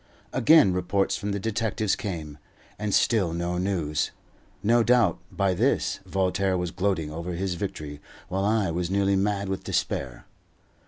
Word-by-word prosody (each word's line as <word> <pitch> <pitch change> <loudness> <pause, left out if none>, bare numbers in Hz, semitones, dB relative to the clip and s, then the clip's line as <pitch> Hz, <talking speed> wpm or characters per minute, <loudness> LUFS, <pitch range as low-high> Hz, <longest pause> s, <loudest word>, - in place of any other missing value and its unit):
Again 140 - +6
reports 90 +2 0
from 105 - -3
the 100 - -2
detectives 110 -1 0
came, 80 -7 -5 0.4
and 105 -1 -2
still 95 -5 +2
no 85 +1 -2
news. 85 -6 0 0.5
No 115 +3 +4
doubt, 115 -7 +3
by 100 -1 +1
this, 100 -1 +1
Voltaire 95 0 +1
was 90 -1 -2
gloating 90 -6 -1
over 85 +3 -5
his 95 +1 -2
victory, 75 -6 -5 0.3
while 95 +2 -1
I 105 -3 +2
was 85 +1 -2
nearly 100 0 +2
mad 100 0 0
with 95 0 -3
despair. 60 -3 -2
95 Hz, 150 wpm, -26 LUFS, 85-100 Hz, 0.5 s, Again